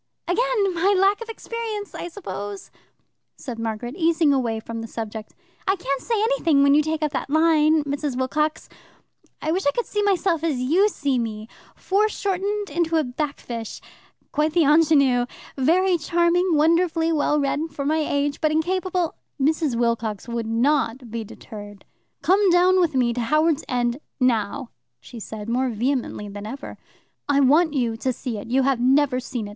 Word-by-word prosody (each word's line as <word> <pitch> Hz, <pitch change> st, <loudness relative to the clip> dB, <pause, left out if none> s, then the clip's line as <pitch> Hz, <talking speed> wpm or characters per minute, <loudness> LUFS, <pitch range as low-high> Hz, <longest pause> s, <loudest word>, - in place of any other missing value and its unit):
"Again 415 Hz, 0 st, +1 dB
my 380 Hz, +4 st, +2 dB
lack 395 Hz, +3 st, +3 dB
of 460 Hz, -, -7 dB
experience, 450 Hz, -2 st, -5 dB
I -, -, -5 dB
suppose!" 205 Hz, -, -7 dB, 0.7 s
said 245 Hz, -5 st, -7 dB
Margaret, 225 Hz, +2 st, -4 dB
easing 325 Hz, -3 st, +3 dB
away 235 Hz, -5 st, 0 dB
from 230 Hz, +1 st, -6 dB
the 225 Hz, -, -6 dB
subject. 220 Hz, -1 st, -7 dB, 0.3 s
"I 385 Hz, -, +3 dB
can't 275 Hz, -7 st, -3 dB
say 455 Hz, -, -1 dB
anything 340 Hz, -, +3 dB
when 280 Hz, 0 st, +5 dB
you 300 Hz, -, +5 dB
take 315 Hz, 0 st, -2 dB
up 300 Hz, -, 0 dB
that 275 Hz, -, -3 dB
line, 315 Hz, 0 st, +4 dB
Mrs. 285 Hz, -2 st, -3 dB
Wilcox. 300 Hz, +4 st, -1 dB, 0.8 s
I 310 Hz, -, 0 dB
wish 365 Hz, -1 st, 0 dB
I -, -, +5 dB
could 480 Hz, -, -2 dB
see 415 Hz, -, -2 dB
myself 370 Hz, -5 st, +1 dB
as 315 Hz, -5 st, 0 dB
you 340 Hz, +12 st, +3 dB
see 280 Hz, -9 st, -1 dB
me 220 Hz, -2 st, -4 dB, 0.3 s
foreshortened 405 Hz, -1 st, -1 dB
into 330 Hz, +1 st, 0 dB
a 315 Hz, -, +2 dB
backfisch. 250 Hz, -4 st, -5 dB, 0.5 s
Quite 305 Hz, +1 st, 0 dB
the 335 Hz, -2 st, +4 dB
ingenue. 280 Hz, -5 st, +4 dB, 0.3 s
Very 345 Hz, +6 st, +2 dB
charming 340 Hz, +2 st, +2 dB
wonderfully 330 Hz, +1 st, +2 dB
well 300 Hz, 0 st, +1 dB
read 290 Hz, +3 st, -1 dB
for 285 Hz, -2 st, -5 dB
my 310 Hz, +2 st, +1 dB
age, 285 Hz, -1 st, -1 dB
but 310 Hz, -, +3 dB
incapable 360 Hz, +2 st, 0 dB, 0.2 s
" -, -, -52 dB
Mrs. 300 Hz, -1 st, +1 dB
Wilcox 230 Hz, -3 st, -1 dB
would 235 Hz, -1 st, -3 dB
not 240 Hz, 0 st, 0 dB
be 230 Hz, 0 st, -3 dB
deterred. 205 Hz, -2 st, -11 dB, 0.4 s
"Come 380 Hz, +6 st, +4 dB
down 360 Hz, +1 st, +4 dB
with 335 Hz, -5 st, +1 dB
me 245 Hz, -2 st, +2 dB
to 245 Hz, -, -2 dB
Howards 305 Hz, +5 st, +2 dB
End 245 Hz, 0 st, 0 dB, 0.2 s
now," 250 Hz, +1 st, 0 dB, 0.3 s
she 230 Hz, -, -11 dB
said, 215 Hz, 0 st, -7 dB
more 250 Hz, +3 st, 0 dB
vehemently 240 Hz, -2 st, -2 dB
than 205 Hz, +1 st, -7 dB
ever. 270 Hz, +5 st, -8 dB, 0.5 s
"I 285 Hz, -1 st, +4 dB
want 300 Hz, +4 st, +4 dB
you 235 Hz, -4 st, 0 dB
to 260 Hz, +3 st, -1 dB
see 245 Hz, -3 st, -5 dB
it. 205 Hz, -, -9 dB
You 265 Hz, +2 st, +2 dB
have 270 Hz, -2 st, +1 dB
never 265 Hz, +1 st, +3 dB
seen 240 Hz, -3 st, -5 dB
it. -, -, -8 dB
290 Hz, 175 wpm, -23 LUFS, 245-340 Hz, 0.8 s, when